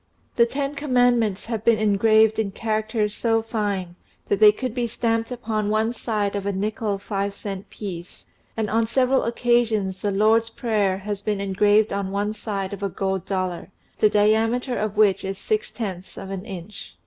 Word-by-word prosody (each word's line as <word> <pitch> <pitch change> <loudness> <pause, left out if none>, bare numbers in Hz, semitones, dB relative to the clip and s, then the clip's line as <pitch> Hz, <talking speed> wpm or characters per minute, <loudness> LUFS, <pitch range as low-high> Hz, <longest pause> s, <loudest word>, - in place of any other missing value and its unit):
The 235 -1 +5
Ten 275 +3 -2
Commandments 245 -7 +2
have 225 -2 -3
been 230 -1 +4
engraved 220 +1 +4
in 205 -3 0
charac 215 0 -1
ters 210 -2 0
so 225 0 +1
fine 200 -6 -3 0.3
that 200 - +1
they 215 -1 +9
could 250 +2 -4
be 240 -1 -1
stamped 230 0 -1
upon 220 -4 -2
one 220 +2 +1
side 210 -4 -2
of 200 0 -3
a - - +1
nickle 210 +1 -2
five 200 0 -3
cent 200 -1 -7
piece, 180 -4 -8 0.3
and 220 -1 0
on 225 +1 +1
several 260 +2 +2
occasions 230 -5 +1
the 205 - 0
Lord's 220 +3 +3
Prayer 210 -5 0
has 200 +1 -5
been 205 -1 -1
engraved 205 +2 +3
on 200 -1 -2
one 205 +2 -1
side 200 -2 -4
of 200 - -7
a 200 - -1
gold 190 -1 -2
dollar, 185 -2 -2 0.3
the 215 - +5
diameter 225 +5 +2
of 210 -2 -2
which 205 -3 +4
is 195 0 -4
six 435 - -1
tenths 190 -5 -6
of 195 - -7
an 195 0 -5
inch. 185 - -9
215 Hz, 185 wpm, -23 LUFS, 200-225 Hz, 0.3 s, they